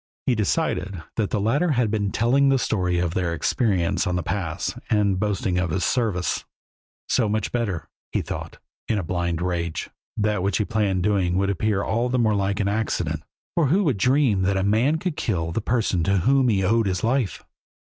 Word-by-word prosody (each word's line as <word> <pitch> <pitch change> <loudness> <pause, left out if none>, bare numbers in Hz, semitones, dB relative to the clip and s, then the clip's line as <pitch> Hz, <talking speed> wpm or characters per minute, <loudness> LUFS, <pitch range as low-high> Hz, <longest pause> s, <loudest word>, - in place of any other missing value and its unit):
He 130 - +3
decided 100 -4 -1
that 110 -3 0
the 105 - 0
latter 145 - +2
had 120 -4 +1
been 105 -2 0
telling 135 +4 +3
the 135 - +4
story 90 -7 0
of 85 -1 0
their 85 -3 -1
experience 95 - +1
on 90 - 0
the 90 - -1
pass 85 -2 -2 0.2
and 100 -3 +2
boasting 95 -3 0
of 90 -1 0
his 90 +4 -1
service. 105 -8 0 0.6
So 115 -5 +2
much 110 +1 -1
the 120 - 0
better, 95 -9 -3 0.2
he - - 0
thought, - - -6 0.3
in 110 - +1
a 100 - -1
blind 85 0 -2
rage; 85 -2 -2 0.3
that 105 -2 +1
which 100 +2 +1
he 105 - 0
planned 100 -5 0
doing 95 -3 +1
would 100 +1 +1
appear 100 +1 0
all 120 +3 0
the 125 - +1
more 110 -3 +3
like 100 -1 0
an 100 - +1
accident, 90 -7 -1 0.3
for 165 -4 +2
who 185 +9 +3
would 140 - +1
dream 125 -1 +3
that 95 +1 +1
a 95 - +1
man 115 +10 +2
could 175 -1 -3
kill 85 - -1
the 115 - -1
person 110 -6 0
to 100 0 +2
whom 130 +7 +3
he 100 -3 +2
owed 110 +3 +2
his 95 -1 -1
life? 120 -2 0
100 Hz, 205 wpm, -24 LUFS, 90-115 Hz, 0.6 s, the